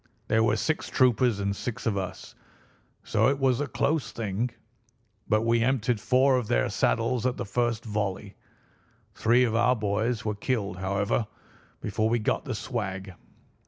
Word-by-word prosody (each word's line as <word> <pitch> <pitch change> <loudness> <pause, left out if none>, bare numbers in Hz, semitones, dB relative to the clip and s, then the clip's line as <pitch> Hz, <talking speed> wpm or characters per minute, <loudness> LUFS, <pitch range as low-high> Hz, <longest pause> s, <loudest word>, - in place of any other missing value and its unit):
There 110 0 +3
were 115 - +3
six 155 - -1
troopers 125 -3 +3
and 100 0 -1
six 125 +4 -5
of 110 -3 +1
us, 95 -2 -5 0.7
so - - +2
it 140 +1 +2
was 135 -1 +2
a 145 - -1
close 150 +1 0
thing, 110 +2 -2 0.8
but 110 +1 +3
we 115 0 +2
emptied 120 -2 +1
four 130 +1 +4
of 120 -4 -2
their - - +1
saddles 115 - +1
at 125 - -2
the 120 - -3
first 120 +2 -1
volley. 105 -2 -3 0.8
Three 120 +3 +3
of 115 -3 +1
our 125 +2 +4
boys 110 +2 -1
were 105 - 0
killed, 100 -3 -2
however, 100 +4 0 0.5
before 110 +2 0
we 120 - +2
got 110 +7 -1
the 130 -5 -3
swag. 100 -4 -4
115 Hz, 160 wpm, -27 LUFS, 100-125 Hz, 0.8 s, four